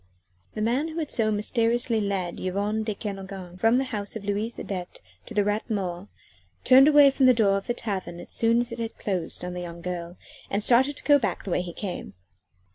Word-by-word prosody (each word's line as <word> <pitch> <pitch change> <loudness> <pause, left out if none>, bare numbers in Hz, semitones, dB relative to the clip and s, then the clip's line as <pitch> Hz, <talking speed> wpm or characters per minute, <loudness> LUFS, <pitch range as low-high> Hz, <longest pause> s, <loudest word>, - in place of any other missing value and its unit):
V 90 0 -39
The 215 - -3
man 250 +8 +1
who 320 0 -7
had 315 -3 -3
so 220 -2 +1
mysteriously 230 +2 +1
led 195 -4 -2
Yvonne 200 +4 -1
de 215 -1 -3
Kernogan 195 -3 -7
from 225 +4 +4
the 265 - +2
house 210 -6 -4
of 210 -2 -6
Louise 210 +3 -2
Adet 185 -3 -6 0.3
to - - -9
the 205 - +3
Rat 210 +3 -1
Mort, 190 -3 -3 0.6
turned 265 +2 +7
away 290 -2 +7
from 270 -1 +3
the 255 - +6
door 205 -4 +3
of 195 - -3
the 240 - -1
tavern 190 -7 -4
as - - -9
soon 230 +1 +3
as 240 0 -4
it 235 - -6
had 230 -1 -4
closed 180 -3 -3
on 180 - -5
the 180 - -5
young 170 -1 -8
girl, 175 -1 -5 0.3
and 200 +1 0
started 265 +5 +3
to - - -7
go 290 -1 +5
back 230 - -2
the 195 - -5
way 175 - +1
he 180 -1 -6
came. 185 - -6
210 Hz, 225 wpm, -26 LUFS, 185-235 Hz, 0.6 s, turned